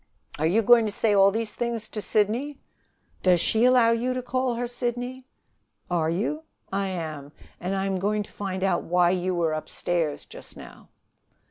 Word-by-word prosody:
"Are 155 - +2
you 215 +7 +2
going 235 0 +6
to - - -2
say 210 +1 +1
all 195 -1 +6
these 220 0 -3
things 235 -1 -3
to 210 - -5
Sidney?" 225 +9 0 0.6
"Does 180 -2 +4
she 220 +7 +2
allow 250 -2 +5
you 245 +2 0
to 255 - -3
call 255 0 -1
her 245 +1 -2
Sidney?" 245 +1 -4 0.6
"Are 165 -2 +1
you?" 215 - -1 0.3
"I 195 0 0
am. 155 -6 -5 0.3
And 185 +2 -2
I 195 0 -1
am 190 -1 -1
going 210 +2 0
to - - -16
find 190 -2 -4
out 185 -3 +2
why 175 0 +3
you 185 0 -1
were 165 -2 +1
upstairs 155 0 -2
just - - -11
now." - - -13
205 Hz, 185 wpm, -25 LUFS, 180-240 Hz, 0.6 s, going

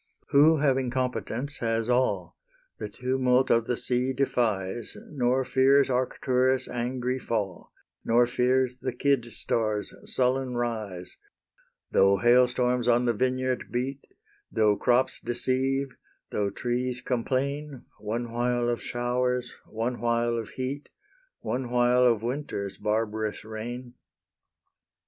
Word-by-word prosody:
Who, 155 +3 +6
having 135 -3 +1
competence, 130 +1 -2
has 115 -1 0
all, 125 +1 +1 0.4
The - - -4
tumult 130 0 +1
of 115 -1 +3
the 125 - 0
sea 125 +1 0
defies, 115 -5 -1
Nor 130 -2 +1
fears 135 +1 +4
Arcturus' 130 0 +1
angry 125 +1 -2
fall, 105 -7 -3 0.3
Nor 120 +1 +4
fears 125 +1 +1
the 130 -1 -3
Kid 135 -5 +1
star's 110 -3 -1 0.2
sullen 130 0 +1
rise, 110 -7 -4 0.7
Though 100 0 +5
hail 120 +5 +5
storms 125 0 0
on 120 0 +4
the 120 - +2
vineyard 130 +2 0
beat, 130 +3 -2 0.5
Though 105 -2 +3
crops 125 +4 +2
deceive, 130 +3 0 0.4
though 100 -1 0
trees 125 +4 -2
complain, 135 +3 -2
One 115 +2 -3
while 120 0 0
of 120 - -1
showers, 125 0 -1
one 115 +3 -3
while 120 0 +1
of 115 -2 -4
heat, 135 +3 -5 0.5
One 125 -1 -3
while 125 +1 +4
of 115 -2 +2
winter's 120 -6 -4
barbarous 110 0 -2
reign. 120 +3 -6
125 Hz, 120 wpm, -27 LUFS, 115-130 Hz, 0.7 s, Who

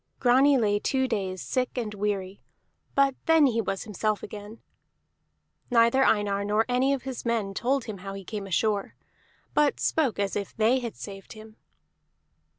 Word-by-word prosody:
Grani 265 +3 +5
lay 205 -3 +2
two 265 +4 0
days 190 -5 -3
sick 255 0 -2
and 220 -4 -3
weary, 200 -2 -3 0.5
but 275 -1 +4
then 325 -2 +6
he 230 -4 +2
was 195 -2 -3
himself 215 0 -2
again. 210 +2 -9 1.1
Neither 235 +2 +4
Einar 205 -4 +2
nor 210 +2 +1
any 255 +2 +2
of 275 -3 -1
his 260 -2 -6
men 225 -4 -1
told 260 +6 0
him 210 -4 -7
how 195 +1 -7
he 195 - -8
came 205 -1 -5
ashore, 200 +1 0 0.6
but 295 -1 +2
spoke 285 -9 +1
as 200 -1 -1
if 200 -2 -4
they 230 +4 +3
had 235 -3 -5
saved 195 -2 -9
him. 215 0 -13
220 Hz, 160 wpm, -27 LUFS, 200-255 Hz, 1.1 s, then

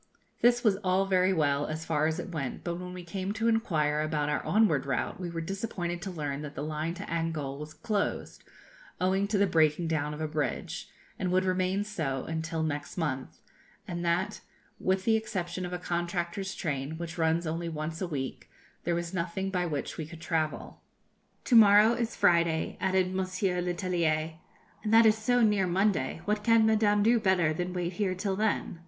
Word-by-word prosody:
This 240 +1 +4
was 210 -4 +4
all 190 -1 +1
very 185 -1 +3
well, 145 -4 +1
as 155 +1 -4
far 155 -1 +1
as 160 - -1
it 185 - -5
went, 140 -6 -4
but 170 0 -3
when 180 0 -6
we 180 -1 -7
came 190 +3 -3
to 225 +2 0
inquire 155 -10 +1
about 150 -1 -1
our 150 - -1
onward 185 -11 +2
route 135 - -2
we 180 -2 -4
were 165 -1 -4
disappointed 175 -1 -3
to 195 - -4
learn 145 -5 -4
that 150 0 -7
the 145 - -4
line 155 +2 -3
to 190 - -6
Angol 160 -6 -3
was 150 +1 -8
closed, 210 -3 -2 0.6
owing 190 +2 +2
to 210 0 0
the 200 - +4
breaking 160 -2 +2
down 150 -2 -1
of - - -9
a 155 - -1
bridge, 150 -2 -3 0.3
and 180 -1 -1
would 185 +1 +2
remain 185 +2 +1
so 155 -11 -3
until 160 0 -3
next 145 +1 -3
month, 135 -6 -3 0.5
and 175 -2 -4
that, 175 +4 0 0.4
with 190 0 0
the 225 - +4
exception 185 -5 -3
of - - -8
a 180 - -2
contractor's 175 +2 -2
train, 145 -1 -3
which 170 0 -6
runs 165 +1 +2
only 165 +2 -2
once 160 +1 -4
a 185 - -1
week, 135 -5 -5 0.4
there 175 - +1
was 170 +1 -3
nothing 185 +2 -2
by 180 -2 0
which 150 -1 -4
we 155 - -4
could 165 0 -10
travel. 160 -1 -2 0.6
'To 245 - +2
morrow 210 +1 +8
is 235 -1 -2
Friday,' 170 -2 +2
added 185 -1 +1
Monsieur 185 -1 -1
Letellier, 170 -3 0 0.5
'and 215 - -1
that 225 +1 +7
is 215 -1 +6
so 245 +3 +2
near 205 -4 +3
Monday, 180 -5 +1
what 210 0 0
can 230 0 +5
Madame 210 -2 +3
do 230 +2 +4
better 185 -6 +2
than 175 +3 -3
wait 180 0 -2
here 185 0 -1
till 190 +1 -1
then?' 205 -4 -1
175 Hz, 195 wpm, -29 LUFS, 160-195 Hz, 0.6 s, morrow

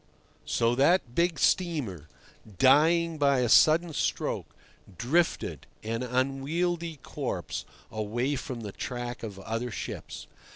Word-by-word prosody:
So 115 0 +2
that 135 0 +3
big 170 +2 +1
steamer, 140 - 0 0.5
dying 160 - +4
by 140 -2 +3
a 125 - +2
sudden 160 +6 +5
stroke, - - -1 0.5
drifted, 160 - 0 0.2
an 115 +2 -2
unwieldy 145 +7 -1
corpse, - - -4 0.3
away 115 +6 -1
from 125 -2 -5
the 105 -2 -6
track 120 +2 -5
of 105 -4 -7
other 115 +5 -3
ships. 110 - -6
135 Hz, 115 wpm, -28 LUFS, 120-165 Hz, 0.5 s, sudden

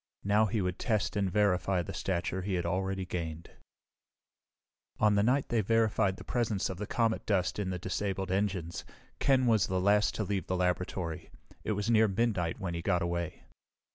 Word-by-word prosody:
Now 105 +2 +3
he 110 0 -1
would 90 0 -2
test 110 -5 0
and 100 -2 +1
verify 95 -3 +2
the - - -6
stature 95 0 -2
he 95 0 -2
had 90 - -1
already 95 0 -1
gained. 85 -2 -5 1.5
On 105 -1 +4
the 100 - +3
night 130 +6 +2
they 115 -2 +2
verified 110 -2 +2
the - - -9
presence 110 -6 -1
of 95 - -7
the 105 - -4
comet 115 -2 0
dust 95 -2 +1
in 100 -2 -1
the 90 - -2
disabled 95 +1 -2
engines, 95 -4 -1 0.4
Ken 130 -2 +3
was 110 -5 +3
the 95 0 0
last 105 +2 +3
to 110 - -1
leave 100 -1 -2
the 95 - 0
laboratory. 90 -2 -2 0.3
It 110 - 0
was 105 +3 -1
near 110 -1 +5
midnight 95 -5 0
when 90 -3 -3
he 85 - -3
got 90 0 +1
away. 85 -1 -3
95 Hz, 185 wpm, -31 LUFS, 90-105 Hz, 1.5 s, near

